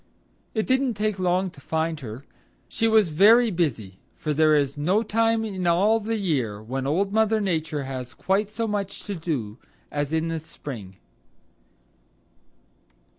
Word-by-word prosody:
It 220 - +1
didn't 260 -2 +1
take 210 -1 -1
long 185 +1 +1
to 140 - -16
find 160 +1 -1
her. 125 +1 -8 0.4
She 225 - 0
was 220 -5 +4
very 220 +9 +6
busy, 115 - -2 0.2
for 150 - -2
there 155 +1 +4
is 140 -2 +1
no 180 +9 +1
time 225 +1 +1
in 190 -4 -3
all 200 +7 +4
the 225 +1 -2
year 135 - -1
when 130 +5 -4
Old 195 +7 0
Mother 220 0 +3
Nature 160 -7 -1
has 130 -2 -6
quite 195 +2 0
so 225 +1 -2
much 200 -2 -3
to 205 - -4
do 140 - -4 0.3
as 145 0 -2
in 160 +1 0
the 165 0 -2
spring. 120 - -9
170 Hz, 155 wpm, -25 LUFS, 145-210 Hz, 0.4 s, very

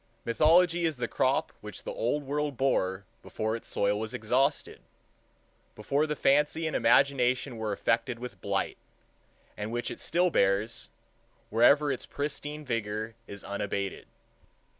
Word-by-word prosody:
Mythology 165 +8 +4
is 160 -4 -1
the 120 -1 -2
crop 130 +3 0
which 105 0 -9
the - - -5
Old 145 +6 -1
World 145 -1 -2
bore 95 -8 +1 0.2
before 110 +1 -3
its 115 - -7
soil 100 +1 +1
was 110 0 -4
exhausted, 130 +7 0 0.9
before 140 +9 0
the 150 - -2
fancy 150 +4 +2
and 160 - -2
imagination 130 0 +3
were 110 -1 -2
affected 115 +4 0
with 125 +1 -8
blight; - - -1 0.8
and 105 +1 -5
which 120 +1 -2
it - - -7
still 180 +1 +1
bears, 100 +2 +1 0.6
wherever 140 +6 +5
its 130 - -4
pristine 150 +1 -4
vigor 110 -2 -3
is 100 -1 -8
unabated. 100 -1 -4
125 Hz, 140 wpm, -29 LUFS, 110-145 Hz, 0.9 s, wherever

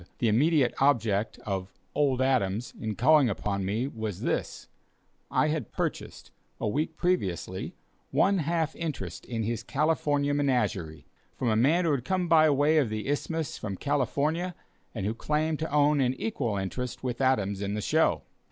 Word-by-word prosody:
The 115 - +1
immediate 135 +3 +3
object 115 -6 +2
of 95 -2 -4 0.2
"old 135 -3 +2
Adams" 120 -4 0
in 110 -2 -3
calling 140 +2 +5
upon 100 -1 -2
me 110 +7 -1
was 110 -7 -5
this; - - -2 0.6
I 155 - +2
had 150 -8 -3
purchased, - - -4 0.3
a - - -1
week 155 +8 -1
previously, 175 - -1 0.3
one 195 0 +3
half 160 0 -1
interest 135 - -5
in 115 -2 -2
his 115 +1 -2
California 145 +1 +1
menagerie, 105 - 0 0.3
from 125 - -1
a 110 - +2
man 155 +10 +3
who 160 - +2
had 135 -4 0
come 185 +3 0
by 155 -1 +6
way 145 +2 +4
of 135 -7 +1
the 110 +2 -4
Isthmus 160 +2 -2
from 100 -3 -4
California, 145 - 0 0.4
and 100 -4 -3
who 105 - 0
claimed 155 +5 -1
to 160 -1 -3
own 145 0 +3
an 130 0 +1
equal 130 - -2
interest 120 +8 -4
with 125 0 -3
Adams 100 -7 +1
in 100 0 -2
the - - -2
show. - - +2
130 Hz, 165 wpm, -28 LUFS, 110-150 Hz, 0.6 s, by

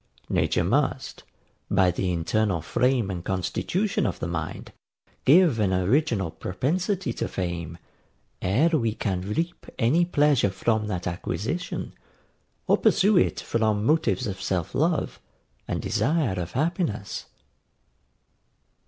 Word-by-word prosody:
Nature - - +1
must, - - 0 0.5
by 95 -1 +4
the 90 +1 -1
internal 90 +2 0
frame 120 - +1
and 90 -2 -5
constitution 170 - -1
of 95 - -3
the - - -4
mind, 80 -2 -5 0.5
give 155 -4 +5
an 100 -3 +2
original 100 - +1
propensity 160 - -2
to - - -3
fame, 85 -3 -4 0.6
ere 120 - +3
we 115 -9 0
can 95 -4 -2
reap 165 - -3
any 135 +9 +3
pleasure 145 - +3
from 105 +3 0
that 90 -4 -3
acquisition, 90 - -3 0.7
or - - +3
pursue 205 +1 +4
it 180 - +2
from 110 -2 0
motives 125 - +2
of 95 -3 -4
self 90 -3 -2
love, 160 +2 0 0.5
and - - -3
desire 140 - +1
of 85 0 -5
happiness. 145 - -2
110 Hz, 120 wpm, -25 LUFS, 95-155 Hz, 0.7 s, give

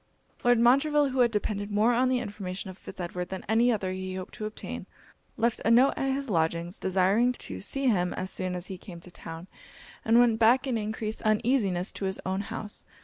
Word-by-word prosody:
Lord 245 0 +5
Montreville, 280 +4 +4
who 260 0 -3
had 240 -1 +5
depended 210 -2 -2
more 215 +4 +3
on 255 +2 +3
the 255 - +2
information 195 -4 -5
of 185 - -14
Fitz - - -11
Edward 180 0 -4
than 190 -1 -6
any 230 +3 +4
other 195 -5 -1
he 185 0 -4
hoped 185 -1 -7
to 215 - -5
obtain, 215 - -6 0.5
left 230 0 0
a - - +2
note 250 +4 +6
at 270 0 0
his 275 0 -4
lodgings 170 -1 -1
desiring 195 +6 +2
to 95 - -8
see 275 - -3
him 180 -6 +2
as 185 +1 -2
soon 185 -1 -1
as 180 0 -4
he 190 -2 -6
came 175 -2 -10
to 180 - -11
town, 165 0 -9 0.6
and 225 +1 +4
went 235 -2 +4
back 240 +4 +5
in 260 -3 -1
encreased 215 0 -3
uneasiness 215 -4 +1
to 195 - -5
his 190 0 -2
own 190 +1 -1
house. 210 0 -5
210 Hz, 210 wpm, -28 LUFS, 185-240 Hz, 0.6 s, note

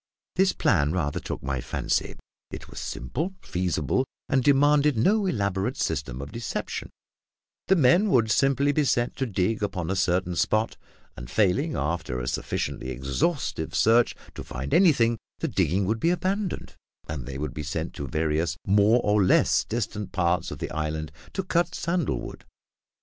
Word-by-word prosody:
This 190 0 +4
plan 75 -5 +2
rather 75 -6 -1
took - - -6
my 65 -2 -2
fancy. - - -1 0.3
It - - -8
was - - -7
simple, 160 - -4
feasible, 90 - 0 0.2
and 130 -2 +2
demanded 145 0 +4
no 200 - +3
elaborate 100 - -1
system 70 -5 -2
of 70 - -9
deception; 115 -1 -4 0.8
the 190 - +5
men 175 +7 +4
would 115 - +3
simply 135 +4 +3
be 150 +1 +2
set 120 -3 +1
to 130 - -1
dig 105 +1 0
upon 95 -4 -2
a - - 0
certain 90 -1 +1
spot, 110 +5 +1 0.4
and, 60 0 -9
failing, 105 - +1
after 75 -4 -2
a - - -4
sufficiently 65 0 -3
exhaustive 70 - -2
search, 115 +2 +4 0.2
to - - -7
find 65 +3 -5
anything, 120 - +4 0.2
the - - -2
digging 95 +5 +1
would 110 +4 0
be 165 - +2
abandoned, 185 +3 -2 0.3
and 70 -5 -5
they 65 - -5
would 75 -1 -4
be 75 - -5
sent 80 +3 -4
to 70 - -5
various 80 +3 0
more 105 +4 +4
or 105 -1 +3
less 90 - +3
distant 105 -3 -3
parts 90 -1 +1
of - - -6
the - - -5
island 75 0 -3 0.2
to 190 - -2
cut 175 -1 0
sandal 170 -3 -1
wood. - - -8
100 Hz, 165 wpm, -26 LUFS, -, 0.8 s, the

